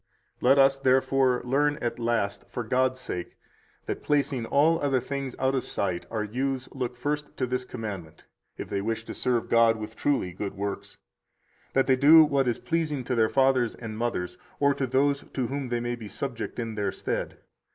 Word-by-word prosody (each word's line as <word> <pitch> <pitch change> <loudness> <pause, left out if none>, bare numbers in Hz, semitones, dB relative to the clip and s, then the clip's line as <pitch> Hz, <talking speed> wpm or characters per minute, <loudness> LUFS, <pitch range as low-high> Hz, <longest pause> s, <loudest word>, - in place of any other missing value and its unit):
115 125 - +2
Let 135 - +8
us, 135 0 +1
therefore, 130 -1 +3
learn 145 +4 +2
at 120 0 -3
last, 115 -4 -1
for 120 - -4
God's 130 +2 +1
sake, 90 -8 -5 0.5
that, - - -4
placing 140 -5 0
all 160 +4 +3
other 135 -2 +2
things 135 0 -4
out 130 0 +1
of 130 -3 0
sight, 90 -3 -2
our 110 -2 -2
youths 130 +4 -2
look 125 -2 -4
first 145 +3 -3
to 130 - 0
this 125 0 -2
commandment, 100 -10 -7 0.3
if - - -5
they 100 - -2
wish 110 +2 -2
to - - -7
serve 120 -2 0
God 115 -1 +4
with 110 +1 -7
truly 140 -11 0
good 100 +1 -5
works, 100 0 -5 0.8
that 135 - +3
they 130 - +4
do 155 +5 +8
what 140 -3 +1
is 120 - +1
pleasing 155 -5 -1
to 125 - -2
their 110 -2 +3
fathers 130 -3 +2
and 110 -2 -7
mothers, 110 -6 -3 0.2
or 140 0 +4
to 135 -1 -2
those 140 +3 +1
to 130 - 0
whom 135 +2 -3
they 120 -1 -1
may 120 0 -2
be 115 -3 -9
subject 120 +1 -5
in 115 -2 -3
their 100 -2 -1
stead. - - -4
125 Hz, 195 wpm, -27 LUFS, 115-135 Hz, 0.8 s, Let